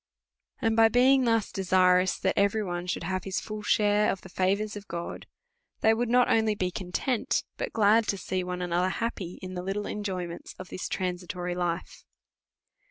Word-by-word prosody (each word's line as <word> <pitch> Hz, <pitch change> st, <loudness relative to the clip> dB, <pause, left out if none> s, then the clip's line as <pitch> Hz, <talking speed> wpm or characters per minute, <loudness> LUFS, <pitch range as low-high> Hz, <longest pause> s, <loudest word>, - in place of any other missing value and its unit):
And 225 Hz, -1 st, +2 dB
by 225 Hz, 0 st, +6 dB
being 255 Hz, +3 st, +4 dB
thus 225 Hz, -2 st, +1 dB
desirous, 185 Hz, -1 st, +3 dB
that 190 Hz, -, 0 dB
every 200 Hz, +2 st, +2 dB
one 175 Hz, -2 st, -4 dB
should 175 Hz, -, -2 dB
have 185 Hz, +2 st, -2 dB
their 195 Hz, -, -7 dB
full 215 Hz, +2 st, -3 dB
share 210 Hz, 0 st, +3 dB
of 190 Hz, -, -5 dB
the 190 Hz, -, -12 dB
favours 200 Hz, +4 st, 0 dB
of 205 Hz, 0 st, -9 dB
God, 170 Hz, 0 st, -6 dB, 0.5 s
they 220 Hz, -, +5 dB
would 235 Hz, +1 st, -1 dB
not 250 Hz, +1 st, +4 dB
only 220 Hz, -1 st, +2 dB
be 185 Hz, -2 st, -1 dB
content, 195 Hz, +7 st, -1 dB
but -, -, -4 dB
glad 220 Hz, 0 st, +4 dB
to 200 Hz, -, 0 dB
see 185 Hz, -1 st, -2 dB
one 180 Hz, 0 st, -4 dB
another 175 Hz, +1 st, +1 dB
happy 190 Hz, -5 st, -3 dB
in 185 Hz, 0 st, -6 dB
the 180 Hz, -, -4 dB
little 195 Hz, +3 st, -3 dB
enjoyments 185 Hz, -4 st, -5 dB
of 185 Hz, -, -9 dB
this 185 Hz, -, -5 dB
transi 180 Hz, -1 st, -3 dB
tory 180 Hz, 0 st, -3 dB
life. 175 Hz, -1 st, -3 dB
190 Hz, 185 wpm, -28 LUFS, 180-215 Hz, 0.5 s, by